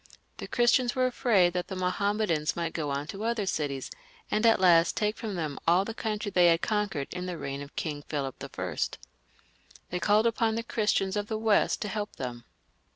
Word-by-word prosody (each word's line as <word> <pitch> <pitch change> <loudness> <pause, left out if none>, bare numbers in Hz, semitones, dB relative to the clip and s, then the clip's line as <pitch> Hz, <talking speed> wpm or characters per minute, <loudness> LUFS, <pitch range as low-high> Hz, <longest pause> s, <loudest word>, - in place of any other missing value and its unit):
The - - -6
Christians 240 0 +3
were 255 -1 +2
afraid 215 -8 +3
that 180 -1 -2
the 190 - -5
Mahommedans 185 -3 0
might 170 -1 -2
go 155 -3 -2
on 140 +1 -2
to 195 +6 -6
other 230 -2 0
cities, 145 -7 -2 0.4
and 215 +2 +3
at 225 - +5
last 170 -2 +5
take 210 0 +1
from 220 -4 -5
them 155 -5 -3
all 180 +3 +4
the 225 - -4
country 215 -2 -3
they 180 -2 +5
had 165 0 +3
conquered 205 -10 -1
in 180 0 -4
the 180 -2 -4
reign 140 -1 -5
of 145 0 -10
King 150 -3 -3
Philip 140 -3 -3
L - - -6 1.4
They 180 - -1
called 210 +5 +3
upon 225 -1 +1
the 230 - -2
Chris 220 -2 0
tians 190 0 0
of 205 0 -2
the 220 - -2
West 220 -1 +2
to - - -3
help 210 +1 -4
them. 120 -2 -6
190 Hz, 205 wpm, -28 LUFS, 165-215 Hz, 1.4 s, at